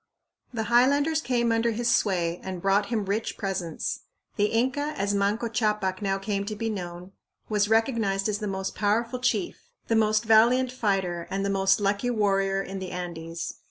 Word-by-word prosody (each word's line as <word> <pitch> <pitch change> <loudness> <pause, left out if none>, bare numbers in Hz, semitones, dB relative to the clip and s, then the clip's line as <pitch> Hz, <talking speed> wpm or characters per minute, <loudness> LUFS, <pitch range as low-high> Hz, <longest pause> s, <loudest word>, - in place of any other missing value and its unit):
The 230 -3 -2
highlanders 285 +7 +3
came 240 -3 +1
under 230 +1 +2
his 235 +2 -2
sway 180 -7 +1
and 185 -1 -5
brought 195 +2 +2
him 220 -3 -1
rich 205 +3 -2
presents. 190 -5 -3 0.4
The 205 - +2
Inca, 265 +7 0
as 200 +1 0
Manco 205 +4 +1
Ccapac 210 -4 -1
now 195 -1 0
came 200 0 -2
to 215 - -3
be 225 +1 -2
known, 180 -2 -6 0.4
was 210 -1 +1
recognized 220 -4 +1
as 210 -1 -1
the 210 - -3
most 190 -1 -3
powerful 230 +4 0
chief, 235 -7 -1 0.2
the 225 - +3
most 215 0 +3
valiant 240 +4 +5
fighter, 195 -8 -1
and 195 +1 -2
the 200 - 0
most 195 0 +3
lucky 205 +4 0
warrior 195 -3 +1
in 195 0 -6
the 190 -1 -5
Andes. 170 -2 -6
205 Hz, 175 wpm, -26 LUFS, 195-230 Hz, 0.4 s, valiant